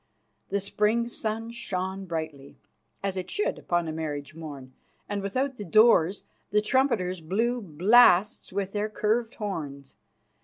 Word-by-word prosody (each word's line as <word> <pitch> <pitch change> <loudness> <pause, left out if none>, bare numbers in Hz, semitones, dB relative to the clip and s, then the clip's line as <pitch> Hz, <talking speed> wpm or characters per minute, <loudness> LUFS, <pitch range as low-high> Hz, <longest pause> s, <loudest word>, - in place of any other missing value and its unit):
The 200 - 0
spring 210 +4 +1
sun 225 -1 -4
shone 190 -4 -4
brightly, 160 -5 -6 0.5
as 195 -1 -1
it 185 - -4
should 420 - -1
upon 175 -1 0
a - - -2
marriage 150 -2 -4
morn, 145 -5 -9 0.3
and 205 -1 -2
without 255 +7 -2
the 210 - -5
doors 200 -2 +4 0.3
the 210 - +3
trumpeters 210 -6 +1
blew 230 +9 0
blasts 195 +3 +4
with 195 0 -2
their 210 +1 -1
curved 225 +2 0
horns. 145 - -6
195 Hz, 140 wpm, -27 LUFS, 165-220 Hz, 0.5 s, doors